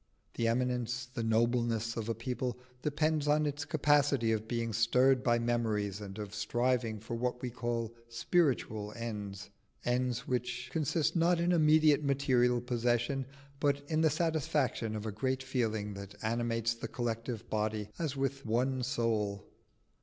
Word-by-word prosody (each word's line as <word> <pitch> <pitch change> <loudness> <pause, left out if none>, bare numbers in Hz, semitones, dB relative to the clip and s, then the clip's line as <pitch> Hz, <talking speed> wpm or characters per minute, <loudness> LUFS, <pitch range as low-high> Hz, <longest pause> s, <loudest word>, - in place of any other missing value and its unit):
The 115 - 0
eminence, 120 0 0
the 125 -1 -5
nobleness 115 0 +1
of 115 -1 -3
a 115 - 0
people 125 +1 -3 0.2
depends 150 0 +1
on 150 +1 +3
its 145 0 -2
capability 145 -6 +3
of 110 0 -1
being 115 -1 -2
stirred 125 +4 +4
by 120 -1 +3
memories, 110 -4 0
and 100 -1 -7
of 105 -2 -6
striving 120 +1 0
for 115 +3 -7
what 125 +1 -1
we 125 - -2
call 115 -1 -2 0.2
spiritual 115 - 0
ends 105 -3 -5 0.3
ends 125 0 0
which 125 -1 -2
consist 160 +1 +1
not 170 +1 +3
in 175 +1 +2
immediate 155 -2 +5
material 125 -3 +2
possession, 120 +2 0 0.3
but 140 -1 +1
in 155 0 +2
the 160 - +5
satisfaction 150 -7 0
of 105 0 -4
a 110 - -2
great 130 +5 -1
feeling 110 -6 -1
that 100 +1 -8
animates 115 0 0
the 115 - -6
collective 115 -1 -3
body 105 -1 -1
as 150 -5 -2
with 135 0 -1
one 125 +4 0
soul. 110 -5 -1
120 Hz, 150 wpm, -32 LUFS, 115-135 Hz, 0.3 s, immediate